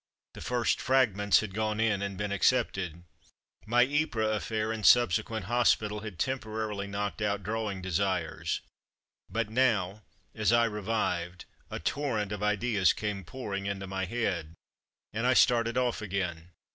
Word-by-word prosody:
The - - -10
first 120 -2 0
Fragments 105 -6 +3
had 105 -3 -6
gone 110 +1 -1
in 110 -3 +2
and 100 -1 -3
been 105 0 -2
ac 100 +6 +4
cepted. 90 -8 -3 0.6
My 120 +2 +5
Ypres 125 -6 0
affair 110 +1 -2
and 110 -1 -4
subsequent 110 -2 +4
hospital 110 -2 +2
had 105 -4 -8
temporarily 110 -4 -2
knocked 100 +1 -3
out 100 -1 0
draw 110 +2 -2
ing 95 -2 -6
desires, 95 -2 -1 0.7
but 110 +2 -2
now, 110 -5 +1 0.3
as 110 0 +1
I 120 0 +5
revived, 100 -5 -2 0.2
a - - -5
torrent 110 -8 -1
of 105 -1 -4
ideas 105 -1 +2
came 105 -2 -3
pouring 100 -2 -5
into 100 -1 -3
my 95 0 -3
head, 90 -7 -2 0.6
and 115 +3 0
I 130 - +4
started 115 0 +4
off 125 -3 0
again. 90 -5 -3
105 Hz, 150 wpm, -29 LUFS, 100-115 Hz, 0.7 s, My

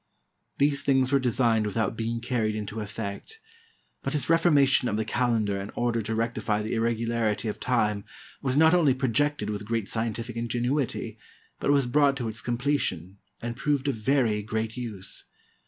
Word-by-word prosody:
These 140 0 +2
things 135 -1 +2
were 140 - +4
designed 115 -3 +2
without 110 +2 -1
being 115 +1 -2
carried 115 -3 0
into 105 0 -5
efifect; 105 - -5 0.7
but 135 - -3
his 150 0 0
reformation 145 -6 +4
of 105 - 0
the 110 - -1
calendar 110 -4 0
in 100 - -6
order 120 -1 0
to 110 +1 -3
rectify 110 -2 -1
the 110 - -3
irregularity 115 -1 0
of 105 - -3
time, 105 -5 +1 0.4
was 130 0 0
not 160 +2 +6
only 155 -7 +4
projected 130 -2 0
with 105 0 -4
great 115 -2 -1
scientific 115 +1 -3
ingenuity, 120 +3 -2 0.4
but - - -1
was 140 -2 +4
brought 140 +2 +3
to 120 -3 -3
its 110 0 -4
completion, 120 - -1 0.2
and 120 0 -3
proved 145 0 0
of 140 - +2
very 115 -2 +1
great 110 +1 -3
use. 110 -7 -7
115 Hz, 165 wpm, -27 LUFS, 110-135 Hz, 0.7 s, not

